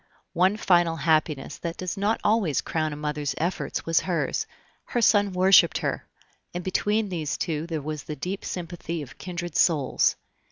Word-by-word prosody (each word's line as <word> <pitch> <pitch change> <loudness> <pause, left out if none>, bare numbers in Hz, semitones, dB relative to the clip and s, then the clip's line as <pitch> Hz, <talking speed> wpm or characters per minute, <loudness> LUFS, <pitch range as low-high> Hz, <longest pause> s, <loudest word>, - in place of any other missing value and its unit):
One 185 +4 +3
final 175 -5 +3
happiness 155 -2 0
that 170 -1 -4
does 185 0 -3
not 205 +3 0
always 205 - +2
crown 155 -1 -1
a - - -5
mother's 150 -2 -3
efforts 175 +4 -2
was 165 -1 +3
hers 180 -3 -1 0.4
her 240 - -1
son 205 -3 +4
worshiped 185 +1 +5
her; - - -3 0.5
and 175 - -3
between 210 +3 0
these 160 -5 -2
two 160 0 -2
there 160 -4 -3
was 155 0 -5
the 150 - -5
deep 185 +7 -4
sympathy 170 -2 -5
of 130 - -13
kindred 175 -2 -5
souls. 150 -7 +3
170 Hz, 165 wpm, -26 LUFS, 155-185 Hz, 0.5 s, worshiped